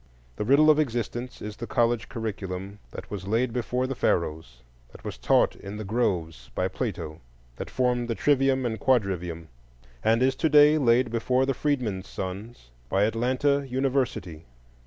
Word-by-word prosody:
The 105 - -2
riddle 145 +6 +6
of 155 - +2
existence 120 -2 -3
is 105 0 -6
the 120 - -6
college 120 -1 +1
curriculum 100 -3 -5
that - - -10
was 95 -2 -5
laid 115 +3 +1
before 125 +1 -1
the 135 - -2
Pharaohs, 75 - -1 0.3
that - - -15
was - - -5
taught - - +2
in 100 +1 -8
the 110 - -5
groves 90 - -1
by - - 0
Plato, 80 +1 -4 0.4
that - - -6
formed 125 -1 0
the 115 - -1
trivium 135 -1 +2
and 110 -2 -2
quadrivium, 90 -9 0 0.6
and 115 +3 +3
is 130 0 +2
to 160 - +1
day 150 +1 +6
laid 120 -2 +3
before 125 +3 +1
the 135 - 0
freedmen's 120 -10 -1
sons 95 - -7 0.2
by 95 +1 +2
Atlanta 130 +6 +1
University. 125 - -1
115 Hz, 160 wpm, -26 LUFS, 95-130 Hz, 0.6 s, riddle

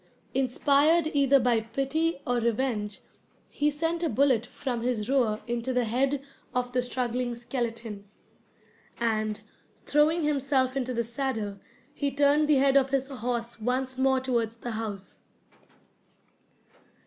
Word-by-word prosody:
Inspired 285 +5 +3
either 280 -1 +5
by 240 -2 +3
pity 275 +7 -1
or 245 0 +1
revenge, 230 -3 -1 0.5
he 295 - +1
sent 325 +3 -1
a 335 - +1
bullet 250 -1 +2
from 245 -4 -4
his 235 -3 -1
roer 245 -5 +2
into 240 +2 -2
the 250 0 +2
head 265 +5 0 0.3
of 250 0 0
the 250 0 +1
struggling 245 -1 -2
skeleton; 230 -4 -4 0.9
and, 215 -2 0 0.4
throwing 310 +3 +3
himself 275 -3 +1
into 255 -2 -1
the 235 - +1
saddle, 230 -4 -3 0.3
he 285 -1 -1
turned 285 +2 +3
the 300 - +5
head 275 0 +4
of 270 -1 +3
his 270 0 0
horse 240 -2 -3
once 260 +2 -1
more 265 0 +3
towards 235 -4 -1
the 235 +1 -6
house. 215 -3 -6
255 Hz, 135 wpm, -27 LUFS, 235-275 Hz, 0.9 s, either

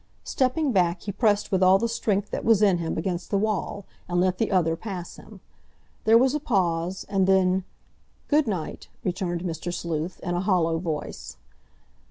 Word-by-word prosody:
Stepping 270 +3 0
back 175 -4 +1
he 205 - -3
pressed 205 0 +1
with 190 -1 +1
all 185 +1 +6
the 230 +4 0
strength 205 -3 -1
that - - -3
was 220 -2 +4
in 190 -4 +4
him 165 -1 -3
against 175 +1 -3
the 200 - +1
wall, 205 -1 -2 0.2
and 175 0 +1
let 185 0 +1
the 225 - +1
other 165 -4 +2
pass 180 -1 -7
him. - - -14 0.6
There 225 +1 +7
was 260 +2 +3
a 300 - 0
pause, 185 - -1
and 195 -2 +1
then—"Good 190 +9 0
night," 185 -7 -4 0.2
returned 180 -2 -2
Mr. 175 0 -4
Sleuth, 170 0 -4
in 175 - -3
a 175 - 0
hollow 170 -4 +1
voice. 160 -3 -5
185 Hz, 175 wpm, -25 LUFS, 175-210 Hz, 0.6 s, There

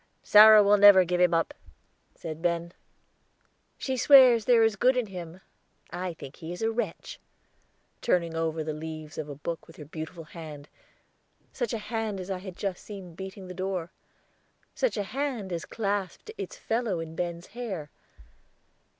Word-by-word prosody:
"Sarah 215 0 +9
will 205 +1 +5
never 200 -2 +8
give 180 +1 0
him 180 -1 +5
up," 165 -1 0 0.6
said 160 -1 -7
Ben. 170 0 -1 1.0
"She 265 - -2
swears 255 -4 +7
there 235 -2 +5
is 225 -1 +2
good 255 +5 +3
in 250 - +1
him. 180 -2 -9 0.5
I 180 -1 -4
think 140 -2 -11
he 165 -1 -8
is 180 +5 -5
a 225 - +1
wretch," 235 +2 -4 0.8
turning 170 -7 +1
over 160 -1 -1
the 155 0 -3
leaves 155 -1 -7
of 150 -1 -5
a 145 - -6
book 165 +4 -6
with 165 - -15
her 150 - -10
beautiful 160 +3 -7
hand, 155 -2 -10 0.8
such 240 -4 -2
a 230 - -1
hand 220 -2 -3
as 185 +1 -6
I 185 - -3
had 185 -1 -9
just 195 -3 -4
seen 195 -5 -9
beating 190 +2 -8
the 180 - -7
door 185 -2 -3 0.8
such - - -1
a 205 - 0
hand 245 -5 -3
as 170 - -4
clasped 205 - -3
its - - -7
fellow 225 - -1
in 165 0 -7
Ben's 170 0 -4
hair. 195 -11 -5
185 Hz, 165 wpm, -27 LUFS, 165-215 Hz, 1.0 s, Sarah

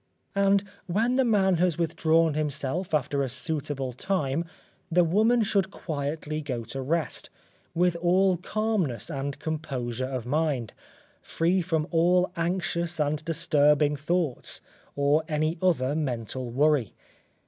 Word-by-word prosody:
And 200 0 +3 0.2
when 225 +8 +1
the 265 - +4
man 195 -6 +3
has 175 -2 +2
withdrawn 165 -1 +2
himself 150 +3 -2
after 145 -2 +1
a 135 - -1
suitable 135 -1 -3
time, 165 0 -1 0.5
the 175 +2 +5
woman 220 +7 +3
should 200 -2 +1
quietly 155 -3 -4
go 125 -6 -4
to 135 +4 -6
rest, 160 +5 -2 0.5
with 175 0 +3
all 180 +2 +3
calmness 185 - -1
and 140 -1 -3
composure 130 -6 -3
of 130 -3 -4
mind, 140 -4 -1 0.5
free 175 +3 +1
from 160 -3 -1
all 180 +2 +3
anxious 170 -1 -1
and 150 0 0
disturbing 150 -2 +3
thoughts, 155 -1 -1 0.4
or 145 +2 +3
any 155 +2 -1
other 150 -7 +2
mental 130 -4 -3
worry. 140 -2 +2
160 Hz, 125 wpm, -27 LUFS, 140-180 Hz, 0.5 s, the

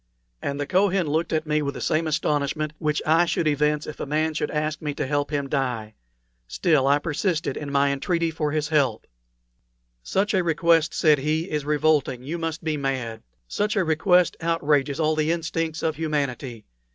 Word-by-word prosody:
And 140 0 -3
the 145 - -1
Kohen 190 +2 +2
looked 155 +3 -1
at 155 0 0
me 150 0 +1
with 140 -1 -3
the - - -5
same 160 +1 0
astonishment 150 0 -1
which 150 -1 -1
I 165 +3 +4
should 165 -1 0
evince 150 0 +1
if 155 - -8
a - - -4
man 155 +2 0
should 150 - -2
ask 150 0 -2
me 150 -2 -3
to - - -2
help 145 +1 -1
him 145 -2 -1
to - - -9
die. 125 -6 -2 0.5
Still, 135 - +2
I 140 +1 +5
persisted 160 0 -1
in 145 -2 -5
my 140 0 +3
entreaty 165 +4 0
for 155 -2 -2
his 150 -1 -1
help. 135 -8 +1 1.0
"Such 195 - 0
a 185 -2 +2
request," 165 -1 +2
said 150 -3 +4
he, 155 +5 -1
"is 150 -2 -2
revolting; 150 -4 +1
you 160 +6 -4
must 165 0 -4
be 155 -1 -1
mad. 130 -5 -3 0.3
Such 210 - -1
a 195 - +2
request 175 +3 +3
outrages 150 -4 +1
all 155 0 +2
the 155 +1 +1
instincts 165 -1 -2
of 160 -2 0
humanity. 140 -7 -3
155 Hz, 190 wpm, -24 LUFS, 145-165 Hz, 1.0 s, I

